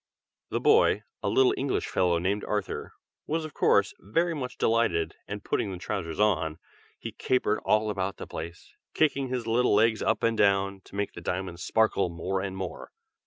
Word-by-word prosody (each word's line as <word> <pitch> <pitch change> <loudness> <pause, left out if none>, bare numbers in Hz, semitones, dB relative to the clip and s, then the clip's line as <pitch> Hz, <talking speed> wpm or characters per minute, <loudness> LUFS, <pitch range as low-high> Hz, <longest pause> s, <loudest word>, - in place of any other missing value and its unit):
The - - -1
boy, 105 - +4 0.2
a - - 0
little 130 +5 +4
English 135 0 -1
fellow 90 -2 +2
named 95 +5 -1
Arthur, 105 -2 -3 0.3
was 160 +1 -1
of 155 - -8
course, 100 -1 +3
very 165 - 0
much 130 -5 -5
delighted, 110 -8 +1
and 105 0 -6
putting 100 - -1
the 95 - -5
trousers 90 -2 -4
on, 80 -7 +2 0.4
he - - -6
capered 125 -4 0
all 110 0 +2
about 95 -1 -3
the - - -6
palace, 85 +2 -8 0.2
kicking 140 -3 +2
his 125 -2 -3
little 115 -1 +3
legs 110 0 +3
up - - 0
and 115 0 +2
down, 100 -2 +2
to - - -13
make 100 0 -2
the 85 - -9
diamonds 90 0 -3
sparkle 110 -4 +2
more 90 +3 -2
and 95 -1 -4
more. 95 -2 -6
100 Hz, 180 wpm, -28 LUFS, 95-115 Hz, 0.4 s, boy